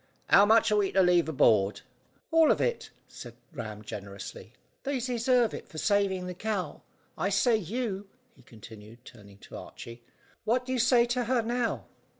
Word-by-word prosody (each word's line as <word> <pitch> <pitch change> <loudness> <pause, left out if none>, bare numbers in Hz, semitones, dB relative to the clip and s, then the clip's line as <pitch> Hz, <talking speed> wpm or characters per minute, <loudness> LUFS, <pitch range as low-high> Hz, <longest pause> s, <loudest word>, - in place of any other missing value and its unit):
How 200 +1 +7
much 225 0 +4
are 210 - +3
we 200 -2 +1
to 190 - +4
leave 175 -2 +3
aboard?" 105 -8 +3 0.5
"All 325 -1 +5
of - - +3
it," 475 - -1 0.2
said 120 -2 -11 0.2
Ram 110 -3 -7
generously; 100 -1 -9 0.3
"they 275 -1 -2
deserve 245 -1 +1
it - - -8
for 155 - -11
saving 195 0 +1
the 180 - -5
cow. 190 -4 -4 0.4
I 195 - 0
say, 225 +4 +3
you," 205 0 -4 0.2
he - - -22
continued, 110 +1 -14
turning 100 -4 -15
to - - -10
Archy, 115 0 -10 0.4
"what 245 +4 0
do 260 - -3
you 255 - 0
say 240 0 +4
to 240 0 -1
her 245 0 +1
now?" 240 +1 -2
200 Hz, 170 wpm, -28 LUFS, -, 0.5 s, How